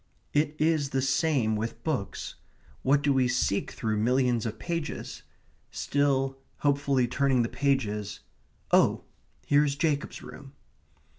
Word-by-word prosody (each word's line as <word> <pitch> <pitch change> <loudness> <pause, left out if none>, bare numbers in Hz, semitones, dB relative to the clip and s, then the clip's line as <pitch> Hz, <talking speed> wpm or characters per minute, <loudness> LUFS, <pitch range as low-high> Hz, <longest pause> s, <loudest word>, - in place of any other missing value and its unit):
It 150 +1 +1
is 155 -3 +2
the 135 0 0
same 135 -5 +2
with 110 +2 -4
books. 135 -12 -3 0.5
What 140 +2 +3
do 145 -1 +3
we 130 -2 +3
seek 125 -5 0
through 110 -1 -2
millions 120 0 +2
of 110 0 -5
pages? 165 +3 -4 0.5
Still 135 -1 0 0.2
hopefully 140 -3 +2
turning 130 -1 +2
the 115 - -2
pages 105 -8 -1 0.5
oh, - - +4 0.4
here 145 +1 +4
is 140 -2 0
Jacob's 145 -1 -1
room. 140 -1 -11
135 Hz, 130 wpm, -28 LUFS, 120-145 Hz, 0.5 s, oh